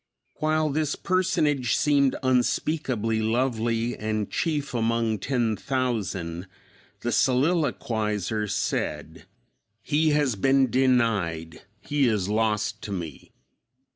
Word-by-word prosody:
While 155 0 +1
this 150 0 0
Personage 155 - +1
seemed 140 -3 +3
unspeakably 125 -3 0
lovely 115 0 0
and 110 -1 -3
"chief 150 -5 -1
among 115 -2 0
ten 120 0 0
thousand," 100 -10 -2 0.5
the 120 - -1
soliloquizer 115 - 0
said, - - -3 0.6
"He 155 +2 +2
has 145 -5 +2
been 135 +4 +3
denied, 110 -11 +1 0.2
he 145 +3 +1
is 105 -4 0
lost 110 0 0
to 105 - -7
me." 85 -6 -6
120 Hz, 100 wpm, -25 LUFS, 110-140 Hz, 0.6 s, seemed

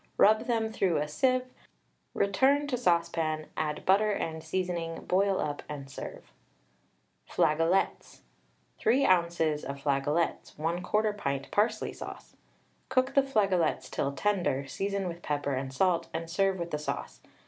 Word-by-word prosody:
Rub 215 +3 +5
them 225 -2 0
through 185 -6 +1
a 150 0 0
sieve, 255 - +1 0.7
return 265 +9 +3
to 285 -3 -1
saucepan, 170 -7 +1
add 150 -1 -2
butter 205 +3 +4
and 160 -5 -3
seasoning, 170 -1 -3
boil 195 +1 +2
up 145 -1 -2
and 140 -2 -7
serve. - - -8 1.0
FLAGOLETS. 165 +5 +1 0.6
3 255 +5 +3
oz. 175 -2 +3 0.2
of 140 - -5
flagolets, 145 +4 0
1/4 180 +7 0
pint 140 -8 -3
parsley 215 +1 +1
sauce. - - -9 0.5
Cook 260 +1 +2
the 275 - +6
flagolets 195 - +1
till 140 - -1
tender, 175 -6 0
season 195 +5 -2
with 170 0 -6
pepper 145 -2 -1
and 130 0 -3
salt, 175 +5 +1
and 165 0 -4
serve 195 +1 +2
with 170 -1 -4
the 150 - -1
sauce. 150 - -5
175 Hz, 135 wpm, -29 LUFS, 150-205 Hz, 1.0 s, the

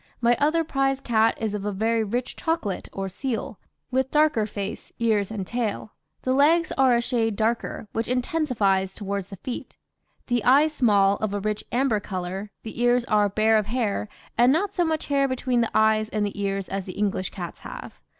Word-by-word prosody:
My 240 0 +4
other 310 +3 +3
prize 270 -3 0
cat 225 -4 +2
is 220 -2 -2
of 205 -1 -3
a 210 - -1
very 225 +3 +1
rich 240 +4 -3
chocolate 320 - -2
or 195 0 -4
seal, 225 +1 -4 0.3
with 260 0 +1
darker 295 -8 +3
face, 200 -1 -6
ears, 215 -4 +1
and 210 -4 -4
tail; 220 -1 -3 0.3
the 255 - +1
legs 315 +5 +4
are 260 -2 +4
a 235 - +2
shade 230 -3 0
darker, 225 0 -1
which 225 0 -1
intensifies 245 -8 0
towards 200 -2 -4
the 200 - -7
feet. 240 +6 -7 0.5
The 240 -3 0
eyes 290 +5 +5
small, 200 -7 +3
of 210 -2 -2
a - - -1
rich 210 +1 -2
amber 245 -3 +2
colour, 190 +1 -5
the 225 +1 -6
ears 245 0 +3
are 210 -2 +3
bare 220 +2 +3
of 210 - -3
hair, 215 -3 -1 0.3
and 245 +2 +6
not 390 +7 +1
so 355 - +1
much 320 -2 -1
hair 275 -1 +2
between 255 -2 0
the 230 - +1
eyes 215 0 +3
and 215 -2 0
the 205 0 -4
ears 195 -1 -1
as 195 -1 -4
the 185 - -6
English 200 -2 -1
cats 175 -3 -7
have. - - -9
225 Hz, 195 wpm, -25 LUFS, 205-255 Hz, 0.5 s, and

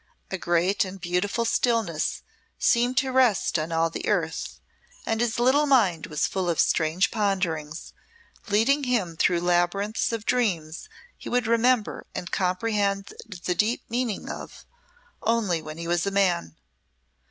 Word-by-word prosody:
A 190 - -2
great 175 +4 +1
and 190 0 -7
beautiful 185 +6 -1
stillness 225 -9 0 0.3
seemed 245 +1 +2
to 265 0 +2
rest 250 -9 +3
on 155 +2 -3
all 165 0 +1
the - - -5
earth, 165 -6 -1 0.5
and 225 0 0
his 235 -2 0
little 265 +5 +3
mind 200 - +3
was 150 -1 0
full 185 -2 -2
of 165 - -1
strange 160 +4 +2
ponderings, 170 -8 -2 0.6
leading 260 +8 +2
him 210 -10 0
through 170 +1 +2
labyrinths 175 +6 +1
of 225 -2 -4
dreams 185 - -1 0.3
he - - -7
would 245 -1 +1
remember 230 0 +1
and 180 - -5
comprehend 200 +1 0
the 180 -3 -3
deep 215 +7 0
meaning 235 -3 -2
of - - -8 0.6
only 215 -7 +1
when 155 0 -8
he 170 0 -6
was 175 +2 0
a - - +3
man. 180 - 0
195 Hz, 145 wpm, -25 LUFS, 170-230 Hz, 0.6 s, rest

